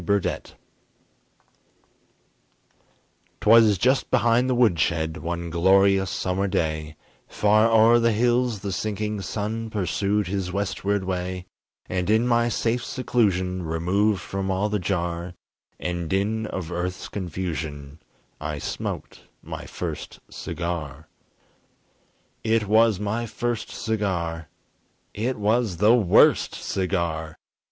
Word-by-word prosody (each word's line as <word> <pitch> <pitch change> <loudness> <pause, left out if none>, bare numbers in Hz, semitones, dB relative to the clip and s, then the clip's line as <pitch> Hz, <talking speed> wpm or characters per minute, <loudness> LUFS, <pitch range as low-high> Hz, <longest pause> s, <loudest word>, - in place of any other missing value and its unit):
BURDETTE 100 +2 -1 2.8
'Twas 110 -2 +6
just 125 +7 +2
behind 120 +2 +3
the 130 - +2
woodshed, 85 -8 +2
One 85 -1 -4
glorious 95 +2 +4
summer 95 +3 -1
day, 80 -5 -2 0.3
Far 110 +2 +3
o'er 115 +1 +6
the 115 0 +3
hills 120 -1 +1
the 100 -2 -3
sinking 105 +1 -2
sun 110 +4 -3
Pursued 105 0 0
his 95 0 -3
westward 100 +1 -1
way; 90 0 -3 0.4
And 90 +1 -2
in 110 +2 +3
my 120 -1 +2
safe 120 +1 0
seclusion 95 -8 0
Removed 90 +5 +1
from 95 0 -4
all 95 +3 0
the 105 0 0
jar 85 -1 -2 0.4
And 85 -2 -3
din 105 +3 0
of 90 -5 -5
earth's 90 +1 -3
confusion 80 -6 -5 0.4
I 75 0 -4
smoked - - -5 0.2
my - - -7
first - - -6
cigar. 80 -3 -5 1.3
It 110 -1 +1
was 110 -1 +4
my 110 +3 -2
first 120 +1 -3
cigar! 85 -8 -2 0.6
It 120 +5 -2
was 105 -2 +1
the 105 +5 +5
worst 105 -8 +4
cigar! 85 -4 -2
95 Hz, 110 wpm, -24 LUFS, 85-110 Hz, 2.8 s, Twas